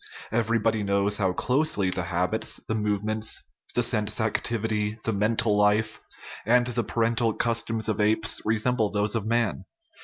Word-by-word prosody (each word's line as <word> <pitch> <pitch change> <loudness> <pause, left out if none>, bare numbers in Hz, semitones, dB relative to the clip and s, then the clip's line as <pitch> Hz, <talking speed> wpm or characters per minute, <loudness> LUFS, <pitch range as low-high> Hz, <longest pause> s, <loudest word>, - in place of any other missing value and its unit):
Everybody 115 -1 +1
knows 100 +1 +1
how 95 -2 +2
closely 125 -4 +1
the 90 - -2
habits, 90 +5 0
the - - -1
movements, 110 +1 0 0.3
the 120 - +2
sense 110 -2 +1
activity, 110 -1 -1
the 115 - 0
mental 110 +1 +1
life, 105 +1 +1 0.4
and 120 +2 +3
the 120 -1 -1
parental 115 -1 0
customs 115 -1 -1
of 110 -1 -1
apes 110 +1 +1
resemble 110 +1 +1
those 105 0 0
of 110 -2 -2
man. 115 -2 0
110 Hz, 145 wpm, -26 LUFS, 105-115 Hz, 0.4 s, and